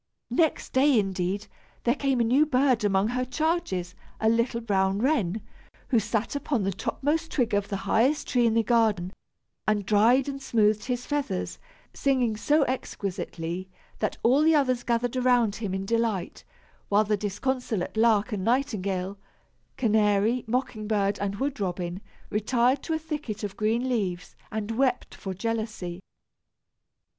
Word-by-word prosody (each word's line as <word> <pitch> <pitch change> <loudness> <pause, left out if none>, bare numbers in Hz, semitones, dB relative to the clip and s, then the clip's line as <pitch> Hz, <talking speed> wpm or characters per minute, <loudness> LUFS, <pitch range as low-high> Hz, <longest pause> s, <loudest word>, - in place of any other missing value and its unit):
Next 320 -3 +1
day, 270 0 +4
indeed, 195 0 -1 0.4
there 240 - +3
came 275 -2 0
a - - +4
new 255 +6 +4
bird 260 -5 +2
among 200 +1 +2
her 250 +1 -1
charges, 255 - -1 0.3
a 220 - +3
little 230 +1 +1
brown 195 -4 +1
wren, 220 - 0 0.5
who 240 - +4
sat 220 +3 -2
upon 280 -5 -1
the 195 - 0
topmost 300 - -1
twig 240 -6 0
of 200 0 +1
the 200 - -3
highest 260 +9 +2
tree 245 -3 +3
in 225 - +1
the 230 - +3
garden, 215 -6 +2 0.5
and 210 -2 +1
dried 225 +7 +4
and 275 -1 -4
smoothed 215 -4 +2
his 245 -1 -2
feathers, 280 -11 -2 0.3
singing 255 -5 +1
so 295 +8 +3
exquisitely 185 -7 -4 0.3
that 215 - -1
all 255 +5 +5
the 320 +1 +5
others 255 -4 +2
gathered 240 +1 0
around 245 -4 +3
him 210 -4 -3
in 190 0 -3
delight, 225 -4 -1 0.5
while 205 +1 +4
the 210 0 +1
disconsolate 215 0 -2
lark 220 0 +3
and 200 -3 -2
nightingale, 200 -6 -1 0.6
canary, 215 +1 +2
mocking 225 -3 -2
bird 205 -2 +1
and 200 0 -2
wood 275 +4 -2
robin, 180 -1 -3 0.3
retired 240 +5 +2
to 325 - -3
a - - +1
thicket 300 -9 -5
of 200 -1 -4
green 225 +4 0
leaves, 190 -8 -2 0.2
and 215 0 -3
wept 250 +1 0
for 190 -1 -6
jealousy. 215 -4 -3
225 Hz, 150 wpm, -27 LUFS, 200-255 Hz, 0.6 s, all